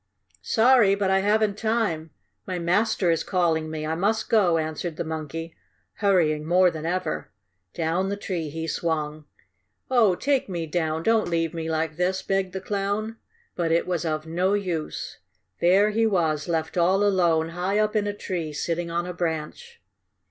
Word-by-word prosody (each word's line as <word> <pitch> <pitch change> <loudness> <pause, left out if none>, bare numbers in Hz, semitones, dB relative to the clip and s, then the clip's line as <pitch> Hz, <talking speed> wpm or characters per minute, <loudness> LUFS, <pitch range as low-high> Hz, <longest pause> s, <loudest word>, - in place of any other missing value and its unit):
"Sorry, 230 -4 +4
but 200 -1 0
I 190 - +4
haven't 210 +1 +1
time! 220 -9 0 0.4
My 185 - -2
master 175 +1 +1
is 165 - 0
calling 165 -4 0
me! 155 -1 -4
I 155 - -1
must 205 +6 0
go!" 190 -7 +4
answered 160 +1 -3
the - - -3
monkey, 160 +1 -5 0.4
hurrying 170 -7 +2
more 180 +3 +4
than 160 0 -5
ever. 180 -2 -2 0.5
Down 170 +4 0
the 200 - -2
tree 175 -6 -3
he 160 +2 -5
swung. 155 -2 -2 0.7
"Oh 220 -8 +4
take 275 +1 0
me 170 -3 -3
down! 160 0 -1
Don't 225 -1 +2
leave 165 -1 0
me 165 -1 -4
like 160 -1 -1
this!" 185 +1 0
begged 195 -1 0
the 190 - -3
Clown. 205 +3 -2 0.4
But 170 -2 0
it 165 - +2
was 175 -3 -1
of 155 -1 -2
no 180 +5 +1
use. 175 -6 -4 0.4
There 195 +4 +4
he 225 +1 +2
was, 160 -6 0
left 160 0 -2
all 190 +4 +3
alone, 170 -5 +2
high 180 +4 -1
up 215 0 +1
in 205 -1 +1
a 205 - -1
tree, 170 -7 -4
sitting 170 +3 -2
on 170 +1 -1
a 180 - -5
branch. 175 - -4
175 Hz, 170 wpm, -25 LUFS, 160-200 Hz, 0.7 s, Sorry